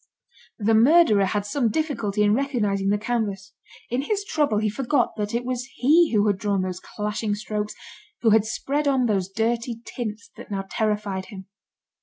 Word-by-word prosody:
The 225 +1 +1
murderer 225 -3 +5
had 205 +1 -1
some 235 +2 0
difficulty 220 -7 -1
in 205 0 +4
recognising 210 -7 0
the 205 - +2
canvas. 205 -4 -3 0.4
In 245 +2 +1
his 405 +7 -1
trouble 295 - +1
he 215 +1 +1
forgot 245 +4 0
that 210 +1 -3
it 240 +1 -1
was 250 -1 -2
he 315 +6 +4
who 210 -2 +3
had 200 -2 +1
drawn 200 -2 0
those 185 -1 -4
clashing 210 +1 -3
strokes, 210 0 -4 0.5
who 225 - +5
had 220 -1 +5
spread 280 +6 -2
on 265 -3 +2
those 195 -5 0
dirty 230 +3 -1
tints 225 -2 -6
that - - -11
now 195 -1 -3
terrified 210 -3 -1
him. 190 -2 -10
215 Hz, 175 wpm, -24 LUFS, 205-245 Hz, 0.5 s, murderer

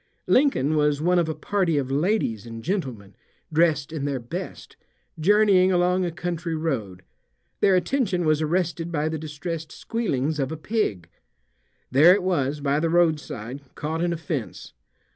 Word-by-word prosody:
Lincoln 155 - +3
was 150 -1 +2
one 175 +3 +3
of 165 -2 0
a 160 - -2
party 185 -6 0
of 135 -2 -1
ladies 140 - 0
and 115 -1 -8
gentlemen, 130 - -4 0.4
dressed 155 -2 +2
in 145 -3 -3
their 140 -2 -1
best, 120 0 -7 0.4
journeying 195 +1 +4
along 180 +1 +2
a 175 - -2
country 170 0 -3
road. 115 - -3 0.6
Their 195 -2 +4
attention 185 -1 0
was 155 0 +2
arrested 170 +1 -1
by 155 -1 0
the 160 -1 -3
distressed 155 +1 -6
squealings 155 - -2
of 135 0 -1
a 160 - -4
pig. 155 - -2 0.8
There 155 +8 +7
it 200 - -2
was 150 -6 0
by 140 +1 +1
the 165 +1 0
roadside, 150 -7 0
caught 160 +2 -2
in 175 - +1
a 170 - -2
fence. 145 -6 -5
160 Hz, 160 wpm, -24 LUFS, 140-180 Hz, 0.8 s, There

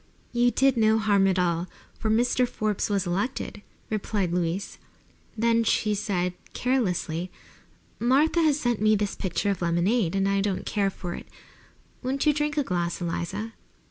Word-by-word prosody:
"You 245 0 +3
did 270 0 +2
no 220 0 +4
harm 205 -3 +3
at 190 -1 +1
all, 175 -1 +1 0.3
for 220 - -1
Mr. 245 +3 +2
Forbes 215 -3 -1
was 200 -2 0
elected," 205 +4 -2 0.3
replied 200 -4 -1
Louise. 180 +2 -2 0.6
Then 230 +1 +3
she 215 -1 +1
said, 185 -3 -1 0.2
carelessly: 185 -9 -1 0.7
"Martha 285 +8 +3
has 305 -2 +3
sent 240 -6 0
me 215 0 +5
this 205 -1 -1
pitcher 195 +2 -1
of 195 - -4
lemonade, 175 +3 +1
and 195 0 +2
I 195 0 +2
don't 195 -2 -2
care 200 -2 +1
for 180 -2 -6
it. - - -8 0.7
Won't 270 +3 -1
you 300 - +5
drink 300 +1 -1
a 290 - +3
glass, 175 -5 -2
Eliza?" 185 +6 -3
205 Hz, 160 wpm, -26 LUFS, 180-240 Hz, 0.7 s, me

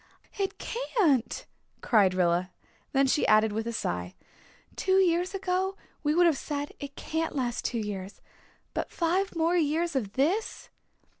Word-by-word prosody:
"It 390 -1 -1
can't," 375 - 0 0.4
cried 200 -6 +4
Rilla; 180 0 +2 0.4
then 275 0 +3
she 270 +2 +2
added 215 0 +5
with 220 +2 -2
a - - -1
sigh, 90 - -3 0.6
"Two 380 0 +2
years 360 0 +2
ago 380 0 -1 0.2
we 300 0 +1
would 350 +1 +5
have 320 -5 +3
said 290 -1 -4
'It 280 -1 -7
can't 320 0 -3
last 245 -4 -2
two 240 - -1
years.' 200 -3 -5 0.5
But - - -2
five 365 +3 0
more 330 +2 +2
years 325 0 +1
of 210 -7 -1
this!" 340 +12 0
290 Hz, 150 wpm, -28 LUFS, 220-355 Hz, 0.6 s, added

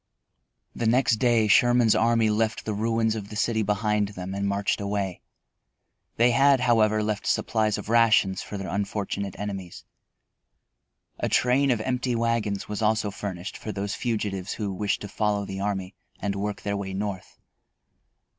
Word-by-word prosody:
The 115 - -2
next 120 -1 +3
day 115 -2 +3
Sherman's 120 +2 +5
army 115 -1 +3
left 110 +1 -1
the 110 - -2
ruins 110 +1 +1
of 105 -2 -6
the 105 - -8
city 110 +1 +1
behind 105 0 +1
them 95 -1 -7
and 100 0 -2
marched 100 +1 0
away. 100 -2 -2 0.9
They 120 +2 +4
had, 135 +1 +4
however, 110 -3 +3
left 105 -1 -2
supplies 110 -2 +1
of - - -7
rations 115 -4 +3
for 105 - -6
their 100 -1 -5
unfortunate 100 -1 -3
enemies. 95 -3 -6 1.3
A - - -1
train 130 +3 +3
of 120 -4 +1
empty 125 +1 -1
wagons 115 -3 -1
was 105 +1 -4
also 110 -1 +1
furnished 95 -2 -6
for 110 - -6
those 100 0 -3
fugitives 105 -5 -2
who 100 -3 -3
wished 100 +2 -1
to 105 - -5
follow 105 0 -1
the 95 0 -6
army 95 -2 -3 0.3
and 100 0 -2
work 100 +1 -4
their 100 0 -1
way 95 -1 -4
North. 100 -2 -5
105 Hz, 160 wpm, -26 LUFS, 100-115 Hz, 1.3 s, Sherman's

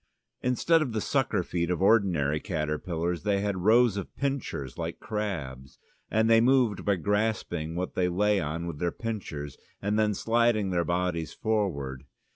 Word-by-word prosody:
Instead 155 +6 +3
of 130 -7 -2
the 110 - 0
sucker - - 0
feet 85 -1 -2
of 90 - 0
ordinary 90 -8 +3
caterpillars 85 0 -2
they 100 -1 +1
had 100 -2 -1
rows 110 +1 +4
of 100 - -6
pincers 135 - -3
like - - -5
crabs, 70 - -4 0.3
and 110 +1 +2
they 115 0 +6
moved 125 -4 +3
by 100 - +2
grasping 100 -5 -1
what 90 +1 -3
they 90 -1 +1
lay 105 +3 +2
on 85 +1 -3
with 85 -4 -6
their 85 -1 0
pincers, 80 - -5 0.2
and 105 +2 0
then 105 -1 +2
sliding 115 -3 +2
their 85 -1 +1
bodies 85 -2 -1
forward. 70 -12 -2
95 Hz, 160 wpm, -28 LUFS, 85-110 Hz, 0.3 s, they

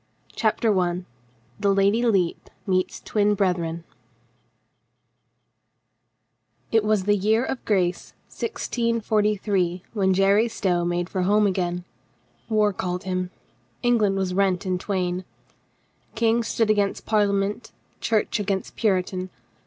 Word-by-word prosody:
CHAPTER 220 0 +1
ONE 180 -2 0 0.5
THE 200 - +2
LADY 200 +4 +3
LEPE 195 -8 +1 0.2
MEETS 185 -2 0
TWIN 210 -1 +1
BRETHREN 170 -4 -1 2.9
IT 225 -1 +3
was 215 -2 +2
the 205 +2 +3
year 215 +4 +2
of 265 - -4
grace 180 -4 0 0.2
1643 210 - -1
when 190 -3 +2
Jerry 200 +4 +4
Stow 180 -6 0
made 175 0 -1
for 185 - -2
home 210 +3 +3
again. 180 -2 -1 0.7
War 210 -2 +2
called 180 0 -3
him. 185 -1 -2 0.5
Eng 240 -1 +3
land 200 -2 +2
was 190 -1 -1
rent 190 0 +1
in 185 -1 -1
twain. 185 -2 -2 0.9
King 230 +1 +2
stood 225 -1 +1
against 205 -2 0
Parlia 210 -2 +2
ment, 205 +4 -3 0.3
Church 220 -1 0
against 195 -2 -2
Puritan. 185 -3 0
195 Hz, 120 wpm, -24 LUFS, 185-215 Hz, 2.9 s, Jerry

